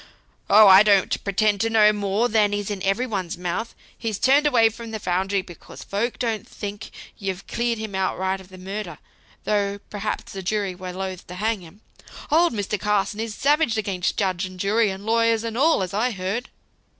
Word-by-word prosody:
"Oh! 210 +1 +8
I 190 0 +9
don't 200 -3 +3
pretend 200 0 +1
to 225 - +1
know 215 -1 +5
more 205 +3 0
than 210 -2 +2
is 205 0 -3
in 200 -2 -4
every 195 +6 +1
one's 195 -8 -3
mouth: 180 +6 -4 0.2
he's 225 -4 -3
turned 280 +6 +4
away 230 -5 +4
from 230 +1 -9
the 220 -1 -5
foundry, 190 +1 0
because 175 -2 -12
folks 225 +5 -2
don't 225 -5 -2
think 205 0 -7 0.3
you've 195 -2 -4
cleared 235 -1 -1
him 215 -2 -6
outright 190 0 -1
of 190 - -16
the 185 - -12
murder; 190 -2 -6 0.5
though 200 -1 0
perhaps 210 +1 -4
the 195 - -5
jury 200 0 -1
were 180 0 -7
loth 185 0 -6
to 180 - -8
hang 215 +1 -1
him. 175 +5 -15 0.5
Old 335 +3 +4
Mr. 205 -1 -2
Carson 205 +1 0
is 225 -1 -4
savage 290 -4 +2
against 195 -4 -1
judge 190 -3 0
and 185 -1 -7
jury, 210 +3 +2
and 190 +1 -6
lawyers 230 0 +2
and 230 -1 -4
all, 280 -4 +3
as 185 +1 -5
I 220 +5 +1
heard." 200 +4 -3
205 Hz, 195 wpm, -23 LUFS, 190-225 Hz, 0.5 s, I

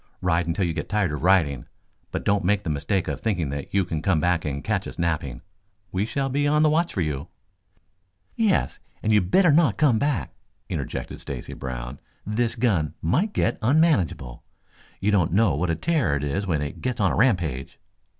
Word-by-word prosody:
Ride 85 -1 +1
until 85 +3 0
you 85 - -1
get - - -5
tired 100 -5 +1
of 75 - -4
riding, 80 -8 +2 0.4
but - - -3
don't 100 0 +2
make 100 +2 +1
the 80 - -2
mistake 90 +6 -1
of 70 -3 -3
thinking 90 -10 -1
that 70 -1 -5
you 100 -2 +2
can 80 -3 -3
come 90 -2 +2
back 85 +1 +1
and 70 -1 -3
catch - - -1
us - - -9
napping. 80 -7 -2 0.5
We 95 +3 -1
shall 135 +3 -1
be 145 +2 0
on 150 +1 +3
the 155 - +4
watch 170 +2 +1
for 95 - 0
you." 75 -1 -2 1.1
"Yes, 215 -4 +1 0.2
you 105 -1 +4
had 90 - -5
better 180 - +5
not 145 - +3
come 135 -7 +3
back," 145 -8 -1 0.4
interjected - - -4
Stacy - - -6
Brown. 65 0 -6 0.3
"This 115 +3 0
gun 100 - 0
might 165 - +1
get - - 0
unmanageable. 115 - +1 0.6
You 105 +2 +1
don't 90 -6 +2
know 100 -3 +4
what 85 +5 -1
a 85 - +1
terror 155 - +1
it 70 - -2
is 95 +8 -2
when 80 -5 0
it 75 - -6
gets 125 -1 -2
on 95 -3 +3
a - - -1
rampage." 90 - 0
95 Hz, 200 wpm, -24 LUFS, 80-120 Hz, 1.1 s, better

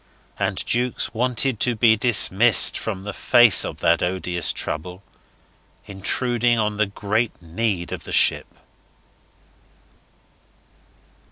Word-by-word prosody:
And - - -3
Jukes 120 0 -2
wanted 125 0 -1
to 125 -2 0
be 110 0 +3
dismissed 110 0 +4
from 95 -4 -6
the 100 0 -7
face 120 -4 +4
of - - -8
that 85 0 +1
odious 90 -1 0
trouble 90 +4 -5 0.8
intruding 120 +4 -1
on 105 -1 -2
the 110 -1 0
great 105 +3 -3
need 90 +1 -4
of - - -7
the - - -9
ship. - - +2
110 Hz, 110 wpm, -21 LUFS, 95-120 Hz, 0.8 s, dismissed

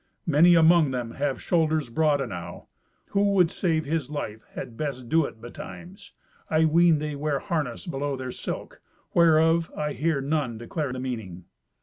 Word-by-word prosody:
Many 170 +2 +6
among 165 -2 +5
them 125 -3 -3
have 140 +1 -2
shoulders 155 -6 0
broad 150 +1 +2
enow. 90 -8 -6 0.4
Who 200 - +1
would 180 -4 +4
save 160 -6 0
his 150 -2 -2
life 110 -8 -5
had 115 - -6
best 130 -3 -4
do 160 -1 +3
it 115 - -8
betimes. 175 - -10 0.4
I 160 0 +3
ween 165 +1 +5
they 150 0 -4
wear 145 0 -1
harness 145 -3 -3
below 145 -4 -2
their 130 -1 -5
silk, - - -6 0.3
whereof 165 0 +4
I 150 -1 -2
hear 150 +3 0
none 135 -4 -1
declare 135 +5 -4
the 130 - -5
meaning." 110 -9 -5
150 Hz, 160 wpm, -26 LUFS, 125-160 Hz, 0.4 s, Many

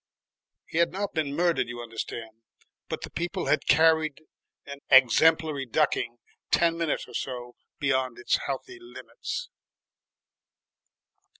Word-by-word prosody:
(He 165 - -2
had 170 0 +3
not 200 +2 -3
been 150 -3 -1
murdered, 170 +1 +2
you 120 0 -7
understand, 115 -1 -7 0.5
but - - -4
the - - -7
people 175 +2 -3
had - - +1
carried 160 0 +4 0.4
an 140 0 -8
exemplary 145 +2 +5
ducking 120 -2 0 0.3
ten 170 -1 +3
minutes 165 -2 -2
or - - -14
so 125 -2 -5 0.2
beyond 130 -4 0
its 120 - +1
healthy 370 - -5
limits.) 365 +7 -7
150 Hz, 120 wpm, -27 LUFS, 130-165 Hz, 0.5 s, exemplary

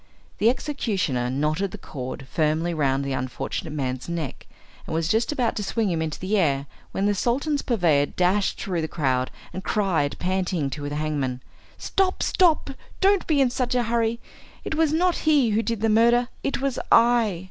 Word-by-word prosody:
The 220 - +5
executioner 195 - -1
knotted 155 +8 0
the - - -8
cord 130 0 -7
firmly 160 +2 0
round 140 -3 0
the 135 - -2
unfortunate 130 +4 -4
man's 130 -2 -3
neck 165 -6 -5 0.4
and - - -3
was 165 0 0
just 225 - +1
about 250 -6 0
to 210 - -2
swing 210 0 0
him 165 -2 -1
into 155 -1 -3
the 195 +3 0
air, 140 -5 +1 0.3
when 195 - -1
the 205 - +3
Sultan's 275 +8 0
purveyor 165 - +2
dashed 185 +5 +1
through 180 -4 -2
the 160 - -2
crowd, 130 -5 0 0.2
and 190 - -6
cried, 185 -9 0
panting, 180 -5 -1
to 145 0 -4
the 145 - -4
hangman, 145 -5 -2 0.3
"Stop, 380 -1 0
stop, 330 -6 +3 0.3
don't 395 0 +3
be 295 -4 +3
in 255 -2 +3
such 250 0 -1
a 245 - +2
hurry. 230 0 0 0.4
It - - -3
was 315 -1 +2
not 350 +3 +2
he 275 -7 +4
who 215 +2 +2
did 230 -2 -3
the 225 - +2
murder, 235 +3 +4
it 275 - -2
was 275 -2 -1
I." 235 +1 +6
190 Hz, 185 wpm, -24 LUFS, 150-240 Hz, 0.4 s, I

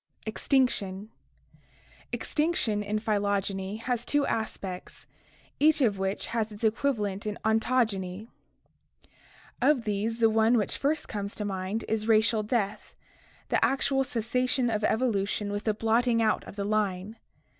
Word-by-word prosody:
J - - -2
EXTINCTION 245 -7 +1 0.6
1! - - -33 0.5
Extinction 300 -10 0
in 210 +1 -1
phytogeny 205 -1 -1
has 245 -2 -1
two 290 +2 +1
aspects, 195 -4 -4 0.5
each 310 +1 +5
of 210 -6 +2
which 195 +1 -1
has 220 -2 0
its 210 +2 -10
equivalent 215 -3 0
in 210 - -3
ontogeny. 220 -4 0 1.3
Of 265 -1 +3
these 215 +1 -1
the 225 - +6
one 225 +2 +4
which 210 - 0
first 295 +3 0
comes 200 -1 -4
to 210 - -3
mind 195 +2 -3
is 220 0 -1
racial 220 0 +4
death 210 -2 -2 0.3
— - - -30
the - - +2
actual 270 0 +2
cessation 250 +1 0
of 215 -1 -1
evolution 210 -3 0
with 205 +1 -4
the 215 - +2
blotting 230 +2 +2
out 220 -1 +2
of - - -10
the 200 -1 -3
line. 205 0 -1
220 Hz, 145 wpm, -28 LUFS, 205-240 Hz, 1.3 s, the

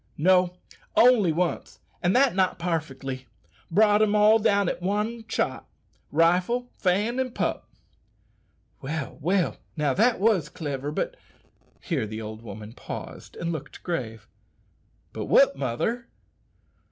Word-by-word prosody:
"No, 180 +2 +3 0.4
only 230 -8 +6
once, 175 +2 -2 0.2
and 175 +2 +2
that 265 0 +4
not 185 -1 +1
parfetly. 135 -6 -3 0.4
Brought 210 +3 +4
'em 215 -1 +3
all 210 +1 +6
down 200 -3 +2
at - - -2
one 210 +5 -2
shot - - -2 0.4
rifle, 180 +10 +2
Fan, 210 +7 0
an' 255 -2 -2
pup!" - - -2 1.1
"Well, 145 +1 -5
well, 180 +4 +1 0.2
now 150 -3 +1
that 230 - +3
was 195 -8 +2
cliver; 145 -4 -4
but - - -2 0.3
." - - -40 0.3
Here 150 - -2
the 110 +1 -6
old 110 0 -7
woman 110 0 -9
paused - - -8
and 170 0 -3
looked 150 -3 -7
grave. 115 - -4 0.9
"But - - -4
what, - - +5
mother?" 140 - -2
180 Hz, 130 wpm, -26 LUFS, 140-215 Hz, 1.1 s, only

